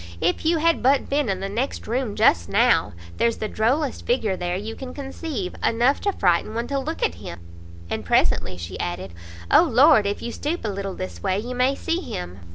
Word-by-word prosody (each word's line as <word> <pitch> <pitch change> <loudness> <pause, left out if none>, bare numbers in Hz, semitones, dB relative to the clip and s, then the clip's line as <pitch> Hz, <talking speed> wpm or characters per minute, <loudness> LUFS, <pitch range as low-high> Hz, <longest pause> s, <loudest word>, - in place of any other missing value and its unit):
if 175 - 0
you 330 +1 +3
had 330 +1 +2
but 270 +2 +3
been 285 -4 +1
in 190 -1 -1
the 195 - -2
next 235 +7 -3
room 235 -2 -2
just 85 0 +3
now! - - +3 0.3
there's 230 -1 +1
the 215 - -3
drollest 255 +7 0
figure 225 -5 0
there 175 -1 -2
you 215 +4 -5
can 255 -1 -8
conceive; 270 - -5
enough 240 +5 +2
to 405 - +1
frighten 185 - +1
one 235 +1 -1
to 280 +2 -1
look 320 - -4
at 460 - +2
him." 85 - -9 0.5
And - - -3
presently 95 +1 +1
she 85 +1 -7
added 90 0 -4 0.4
"O - - +8
Lord, 280 -6 +5
if 200 - -3
you 235 - -3
stoop 300 +3 -3
a - - 0
little 195 -1 -4
this 90 -2 -6
way, 185 - 0
you 240 +5 -4
may 255 +2 +2
see 335 +4 -2
him!" 90 - -6
230 Hz, 210 wpm, -23 LUFS, 185-275 Hz, 0.5 s, O